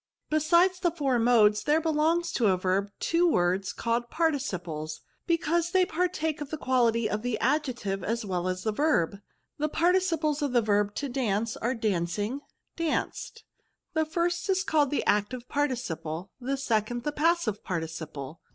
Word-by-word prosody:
Besides 340 +4 +3
the 355 - +2
four 280 -7 0
modes, 220 -3 +4
there 300 +2 +4
belong 320 +1 +2
to 230 - +2
a 190 -2 +3
verb 190 +2 0
two 340 +1 +2
words 180 - +1
called 235 +1 -1
Participles, 180 - -2 0.3
be 335 - +3
cause 340 +1 0
they 370 0 +3
partake 320 -3 -1
of 290 - -5
the 310 - -4
quality 235 -5 +2
of 210 0 -2
the 245 -1 -1
ad 300 +3 +1
jective 200 -7 -4
as 230 +2 -2
well 180 -2 -2
as 185 0 -2
of - - -11
the 220 - 0
verb. 200 - +2 0.4
The 305 +1 0
parti 350 +4 +3
ciples 320 -5 -1
of 285 -3 -1
the 240 - +4
verb 205 -1 +1
to 285 - -2
dance 230 -4 -1
axe 235 +1 -1
dancing, 205 +5 -1 0.4
danced; 335 +7 -3 0.5
the 315 -1 +2
first 345 +3 -1
is 375 -1 +2
called. 300 -5 +2
the 290 - -1
active 220 +4 0
parti 290 -2 0
ciple; 165 -5 -5
the 270 +2 -2
second, 240 -2 -1
the 295 - -1
passive 300 - +1
participle." 160 -4 -5
250 Hz, 175 wpm, -28 LUFS, 205-315 Hz, 0.5 s, modes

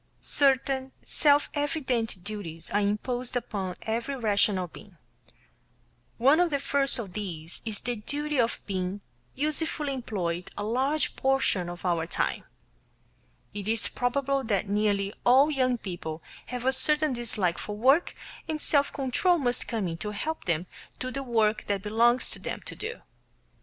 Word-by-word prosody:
Certain 270 -1 +2
self 290 -1 +3
evident 260 - -1
duties 175 -6 -6
are 205 - +3
imposed 240 +5 -1
upon 195 -6 -2
every 230 +5 -2
rational 205 -5 +2
being. 185 +2 -14 1.2
One 275 +7 +5
of 355 -1 +4
the 285 - +1
first 275 0 +1
of 205 -7 -5
these 170 -6 -5
is 215 -2 -2
the 245 -1 -2
duty 290 +6 -2
of 235 -1 +2
being 190 0 -2 0.3
usefully 300 0 -1
employed 180 -9 -3
a 205 - -2
large 265 +8 +1
portion 265 -10 +1
of 175 +2 -8
our 170 -2 +1
time. - - -1 1.1
It 205 -1 -5
is 225 0 +1
probable 275 +2 0
that 205 -2 0
nearly 200 -1 +1
all 270 +5 +6
young 255 -3 +2
people 170 -6 -6 0.2
have 250 -1 -4
a 265 - +4
certain 300 +1 +3
dislike 215 -7 0
for 210 0 -5
work, 270 +9 +4 0.3
and 310 -1 -1
self 285 -1 +2
control 285 +7 +2
must 250 -5 0
come 220 -6 -1
in 165 -1 -4
to 210 - -4
help 310 +10 -4
them 170 -1 0 0.3
do 255 0 -4
the 275 - -3
work 225 -4 +1
that 200 -2 -1
belongs 235 +4 +3
to - - -7
them - - -4
to - - -8
do. 450 +3 -6
235 Hz, 155 wpm, -28 LUFS, 200-275 Hz, 1.2 s, all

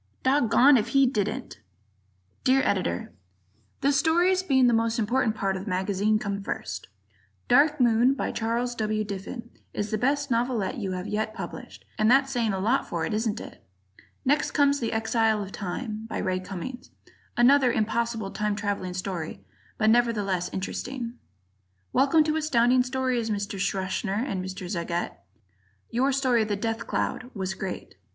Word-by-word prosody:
Doggoned 265 0 +5
If 215 - -2
He 275 - +6
Didn't! 240 +1 -2 0.8
Dear 265 +1 +4
Editor: 90 - -1 0.7
The 280 - +3
stories, 350 +5 +3
being 270 -8 +3
the 240 - +4
most 225 0 +1
important 225 0 +1
part 195 -2 -1
of 190 +1 -5
the - - -5
magazine, 200 +3 +1
come 200 -2 -3
first: 95 - -5 0.6
"Dark 300 +1 +4
Moon," 240 +2 +4
by - - -2
Charles 235 +2 -1
W. 215 -2 -1
Diffin, 210 +4 -7 0.2
is 205 +1 -2
the 215 - 0
best 280 +2 0
novelette 235 0 0
you 195 -4 -3
have 180 0 -4
yet 215 +1 -2
published, - - -8
and 215 +1 +4
that's 270 +2 +4
saying 235 -4 +1
a 195 - -2
lot 225 +8 +1
for 165 -2 -1
it, - - -3
isn't 220 0 -1
it? - - -11 0.6
Next 280 +2 +2
comes 285 -1 +3
"The 230 - -2
Exile 225 -1 +1
of 195 - -9
Time," 215 +3 -5
by - - -4
Ray 185 0 -1
Cummings, 195 +7 -7 0.5
another 255 +1 +5
impossible 225 -2 -1
time 210 -1 -1
traveling 200 -3 -3
story, 180 - -5 0.3
but 215 0 +4
nevertheless 205 -7 +1
interesting. 240 +5 -5 0.7
Welcome 285 +4 +4
to 310 +1 0
Astounding 255 -5 +3
Stories, 250 -2 -1
Mr. 200 -1 -3
Schachner 195 +4 -1
and 190 -7 -2
Mr. 185 0 -6
Zagat. 170 -2 -3 0.7
Your 260 +4 +2
story 255 -4 +2
"The 210 -1 -1
Death 225 +2 -3
Cloud" 250 - -2
was 190 -1 -2
great. 190 -1 -6
225 Hz, 160 wpm, -26 LUFS, 200-255 Hz, 0.8 s, He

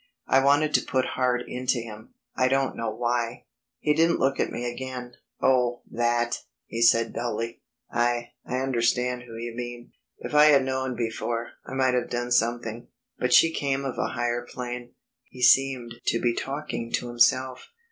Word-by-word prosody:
I 135 0 +4
wanted 145 +2 +3
to - - +5
put 130 -1 -1
heart 125 -1 +1
into 125 0 -1
him. 110 -1 -8 0.2
I 130 - +3
don't 135 0 +1
know 115 -1 -2
why. 120 +1 -2 0.3
He 150 - +1
didn't 165 +2 +3
look 135 +1 +1
at - - +1
me 120 - -4
again. 125 0 -5 0.3
"Oh, 125 -2 +2
that," 120 0 0 0.3
he 115 - -5
said 115 -1 +4
dully, 115 0 -3 0.3
"I 120 0 0
I 130 +1 -2
understand 125 -1 0
who 115 -1 -9
you 115 0 -5
mean.... 120 0 -7 0.3
If - - -7
I 150 0 +7
had 140 -3 +6
known 130 -1 -2
before 115 0 -3 0.2
I 135 - -6
might 130 -1 +2
have 125 - 0
done 120 0 -3
something. 120 -1 0 0.3
But 125 - 0
she 165 +5 +6
came 140 -2 -1
of 130 - -4
a - - +1
higher 120 0 -1
plane." 120 0 -7 0.3
He 125 - -8
seemed 130 -4 +4
to 115 - +2
be 120 0 +1
talking 135 -3 -4
to 125 - 0
himself. 125 +2 +2
125 Hz, 175 wpm, -26 LUFS, 120-130 Hz, 0.3 s, I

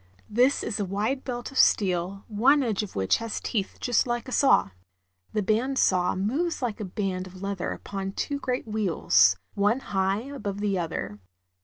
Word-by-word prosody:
This 250 +6 +3
is 220 - -3
a - - +1
wide 210 +8 -1
belt 245 0 -5
of 270 - -1
steel, 190 0 +2
one 260 +7 +4
edge 220 -5 0
of 210 - -7
which 95 -1 +2
has 230 -1 -4
teeth 200 -4 -3
just 245 0 +1
like 240 +1 -2
a - - -7
saw. 270 - +4 0.6
The 210 - 0
band 235 +7 +1
saw 180 -6 +3
moves 275 - -1
like 235 -5 -3
a 210 - -3
band 185 -1 -3
of 185 +1 -11
leather 195 -2 -2
upon 195 -1 -5
two 285 +6 -2
great 250 -2 -2
wheels, 175 - +3 0.2
one 205 +5 +2
high 195 +2 +1
above 235 -7 -5
the 205 -1 0
other. 105 - -4
210 Hz, 180 wpm, -26 LUFS, 190-245 Hz, 0.6 s, one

